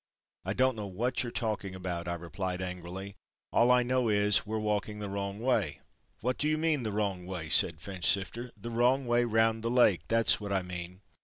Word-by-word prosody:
"I 95 Hz, -, -2 dB
don't 130 Hz, +2 st, +2 dB
know 105 Hz, -2 st, -5 dB
what 115 Hz, +7 st, -1 dB
you're 120 Hz, -, -3 dB
talking 105 Hz, -5 st, -3 dB
about"—I 90 Hz, -2 st, -3 dB
replied 90 Hz, +2 st, -4 dB
angrily. 95 Hz, +2 st, -6 dB, 0.4 s
"All 120 Hz, -, +4 dB
I 125 Hz, 0 st, +5 dB
know 125 Hz, -1 st, +1 dB
is 105 Hz, 0 st, +3 dB
we're 110 Hz, +1 st, -2 dB
walking 105 Hz, -1 st, -1 dB
the 105 Hz, -2 st, -5 dB
wrong 100 Hz, 0 st, -3 dB
way." 100 Hz, -, 0 dB, 0.4 s
"What 125 Hz, +3 st, -1 dB
do 150 Hz, -, +1 dB
you 155 Hz, 0 st, +2 dB
mean 155 Hz, -3 st, +1 dB
the 110 Hz, -3 st, -3 dB
wrong 100 Hz, -4 st, -2 dB
way?" 90 Hz, -4 st, -5 dB
said 80 Hz, 0 st, +4 dB
Finchsifter. 100 Hz, +6 st, 0 dB
"The 120 Hz, -, -7 dB
wrong 125 Hz, +3 st, +2 dB
way 120 Hz, 0 st, +2 dB
round 115 Hz, 0 st, +2 dB
the 115 Hz, -, -1 dB
Lake 120 Hz, -7 st, +4 dB
that's 115 Hz, -2 st, +3 dB
what 100 Hz, -1 st, -5 dB
I 95 Hz, -1 st, +1 dB
mean!" 90 Hz, +1 st, -7 dB
105 Hz, 200 wpm, -30 LUFS, 95-120 Hz, 0.4 s, I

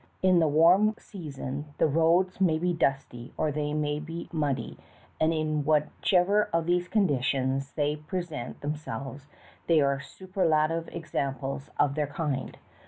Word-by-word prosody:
In 185 Hz, -2 st, +5 dB
the 160 Hz, -, +3 dB
warm 175 Hz, +8 st, +5 dB
season 145 Hz, -4 st, -7 dB
the -, -, +3 dB
roads 165 Hz, +5 st, +2 dB
may 165 Hz, -4 st, +4 dB
be 175 Hz, +2 st, 0 dB
dusty 135 Hz, -5 st, -2 dB
or 155 Hz, -1 st, +1 dB
they 150 Hz, 0 st, -2 dB
may 150 Hz, -1 st, -1 dB
be 165 Hz, +2 st, -6 dB
muddy, 145 Hz, -5 st, -2 dB, 0.4 s
and 160 Hz, +1 st, +3 dB
in 155 Hz, -2 st, 0 dB
whichever 180 Hz, +7 st, +2 dB
of 165 Hz, 0 st, +1 dB
these 175 Hz, +1 st, +1 dB
conditions 135 Hz, -, 0 dB
they 150 Hz, 0 st, 0 dB
present 155 Hz, -4 st, -5 dB
themselves 145 Hz, -2 st, -5 dB, 0.4 s
they 165 Hz, -2 st, +5 dB
are 140 Hz, -1 st, +2 dB
superlative 165 Hz, 0 st, 0 dB
examples 140 Hz, -4 st, -3 dB
of 145 Hz, -1 st, +3 dB
their 150 Hz, 0 st, -1 dB
kind. 145 Hz, -2 st, -3 dB
155 Hz, 140 wpm, -28 LUFS, 140-170 Hz, 0.4 s, In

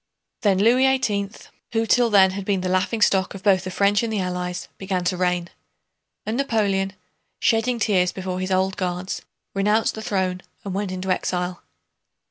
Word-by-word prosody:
Then 200 Hz, -4 st, +3 dB
Louis 240 Hz, +6 st, +4 dB
XVIII, 200 Hz, -6 st, -1 dB, 0.4 s
who 225 Hz, 0 st, +1 dB
till 240 Hz, +1 st, +3 dB
then 195 Hz, -3 st, +6 dB
had 200 Hz, +1 st, -5 dB
been 195 Hz, -1 st, 0 dB
the 185 Hz, -, -2 dB
laughingstock 190 Hz, +1 st, +2 dB
both 195 Hz, 0 st, -10 dB
of -, -, -10 dB
the -, -, -3 dB
French 200 Hz, +2 st, +2 dB
and 230 Hz, -1 st, -2 dB
the 215 Hz, -, -1 dB
Allies, 180 Hz, -1 st, -3 dB
began 190 Hz, -2 st, -2 dB
to 180 Hz, +1 st, 0 dB
reign. 180 Hz, -1 st, 0 dB, 0.7 s
And 220 Hz, +2 st, -2 dB
Napoleon, 200 Hz, -7 st, 0 dB, 0.5 s
shedding 235 Hz, 0 st, +2 dB
tears 190 Hz, -5 st, +2 dB
before 185 Hz, -1 st, -4 dB
his 185 Hz, 0 st, -2 dB
Old 190 Hz, +1 st, +1 dB
Guards, 180 Hz, 0 st, -3 dB, 0.3 s
renounced 210 Hz, +3 st, +2 dB
the 220 Hz, -, -7 dB
throne 185 Hz, -4 st, -1 dB, 0.2 s
and 195 Hz, -, -4 dB
went 200 Hz, 0 st, -2 dB
into 185 Hz, 0 st, -3 dB
exile. 180 Hz, -1 st, -1 dB
195 Hz, 170 wpm, -23 LUFS, 185-210 Hz, 0.7 s, then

